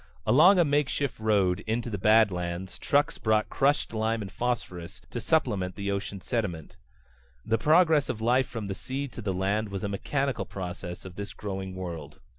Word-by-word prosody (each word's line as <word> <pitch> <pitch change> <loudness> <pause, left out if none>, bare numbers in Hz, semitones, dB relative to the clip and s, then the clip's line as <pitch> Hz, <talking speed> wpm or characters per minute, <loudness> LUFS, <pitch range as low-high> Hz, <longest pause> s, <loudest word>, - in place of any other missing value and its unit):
Along 175 +9 +7
a 175 - +5
makeshift 145 -2 0
road 100 -5 +2
into 115 +1 -1
the 100 - -3
badlands 95 -4 +2
trucks 145 +1 +1
brought 110 -1 +2
crushed 140 -3 +1
lime 110 0 0
and 95 - -8
phosphorus 90 -6 -3
to 120 - -4
supplement 105 - +1
the 100 0 -2
ocean 100 -1 -4
sediment. 95 - -3 0.7
The 115 - +1
progress 160 -2 +4
of 110 - -2
life 125 +3 +2
from 115 -4 -5
the 100 - -3
sea 135 +7 -4
to 120 - -8
the 100 -3 -1
land 100 +3 0
was 100 -1 -5
a - - 0
mechanical 135 +7 -1
process 90 -1 -6
of 90 -1 -10
this 100 0 -6
growing 95 -2 -5
world. 85 -4 -6
110 Hz, 175 wpm, -28 LUFS, 95-125 Hz, 0.7 s, Along